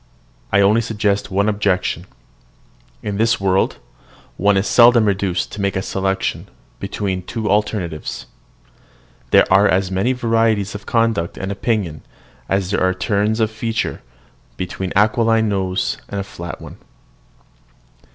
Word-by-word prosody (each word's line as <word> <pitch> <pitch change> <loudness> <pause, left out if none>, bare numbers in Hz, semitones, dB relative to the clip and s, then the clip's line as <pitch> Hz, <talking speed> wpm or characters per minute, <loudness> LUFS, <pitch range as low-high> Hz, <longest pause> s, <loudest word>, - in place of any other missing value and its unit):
I 100 - +4
only 105 +4 +4
suggest 105 -3 -1
one 100 +2 +1
objection. 100 -3 0 1.0
In 100 -1 -3
this 115 +2 +2
world 95 -1 +1 0.6
one 100 +1 +3
is 95 - +1
seldom 120 -2 +6
reduced 95 -3 0
to 105 - -6
make 100 -1 0
a 95 - -1
selection 95 0 -2 0.3
between 95 -3 -3
two 110 +4 -4
alternatives. 100 -7 -1 1.0
There - - +6
are 100 +2 +6
as 95 0 +1
many 95 +7 +1
varieties 115 -4 +1
of 105 -1 -9
conduct 115 -7 0
and 95 +1 -4
opinion 100 - -2 0.5
as 95 -1 0
there - - 0
are 95 0 +2
turns 105 +3 0
of 110 -1 +1
feature 110 0 -3 0.6
between 90 0 -4
an - - +3
aquiline 110 +1 +3
nose 95 -2 -1
and 100 - -3
a - - -2
flat 85 -3 -8
one. - - -11
100 Hz, 140 wpm, -19 LUFS, 95-110 Hz, 1.0 s, seldom